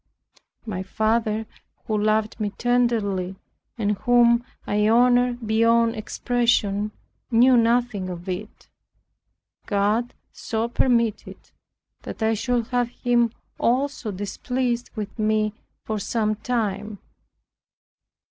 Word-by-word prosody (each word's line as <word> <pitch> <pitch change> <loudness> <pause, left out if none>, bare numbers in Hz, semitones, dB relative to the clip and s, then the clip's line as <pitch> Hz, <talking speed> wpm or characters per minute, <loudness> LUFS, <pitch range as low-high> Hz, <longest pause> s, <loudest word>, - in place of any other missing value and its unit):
My 195 -5 -4
father, 220 +2 0 0.4
who 215 - -1
loved 215 +1 +1
me 210 -1 -1
tenderly, 225 -7 +1 0.4
and 210 -3 -1
whom 240 -1 +4 0.2
I 210 +1 +1
honored 245 0 +3
beyond 230 +1 +3
expression, 215 -2 0 0.4
knew 250 +2 +5
nothing 230 -4 +2
of 175 +1 -7
it. 190 +3 -6 1.0
God 210 +4 0 0.2
so 225 0 -2
permitted 235 -3 +1
it, - - -31 0.5
that - - -6
I 220 0 +3
should 240 +1 0
have 245 -1 +1
him 240 -1 +1 0.3
also 260 -1 0
displeased 240 +5 -2
with 215 +1 -6
me 215 0 +1 0.3
for 215 -1 -2
some 215 0 0
time. 210 -2 -2
225 Hz, 105 wpm, -24 LUFS, 210-240 Hz, 1.0 s, knew